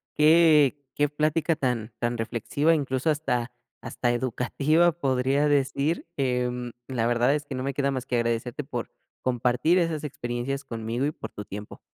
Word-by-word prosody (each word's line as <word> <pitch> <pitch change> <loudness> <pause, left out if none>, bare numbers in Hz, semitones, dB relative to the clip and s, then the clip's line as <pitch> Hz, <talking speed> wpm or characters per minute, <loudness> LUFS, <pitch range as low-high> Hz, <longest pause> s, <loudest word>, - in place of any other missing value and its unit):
qué 150 -2 +5 0.2
qué 145 - +2
plática 155 +2 +1
tan 125 -6 -2
tan 120 0 -1
reflexiva. 125 +8 +1
Incluso, 135 -1 -1
hasta 125 -6 0 0.3
hasta 120 +1 -1
educativa, 135 +7 +2
podría 135 -1 +1
decir, 140 +3 +1
em, 125 -2 -1 0.2
la 120 -4 -1
verdad, 120 +3 +3
es 150 - -3
que 145 - -7
no 130 - -3
me 135 +1 -2
queda 140 +1 0
más 130 -2 -3
que 125 - -2
agradecerte, 115 +3 -1
por 120 -4 -5 0.3
compartir 125 +7 +2
esas 165 -3 -1
experiencias 130 0 -3
conmigo, 115 +1 -3
y 150 - 0
por - - -8
tu 105 - -7
tiempo. 105 +2 -8
130 Hz, 160 wpm, -26 LUFS, 120-150 Hz, 0.3 s, qué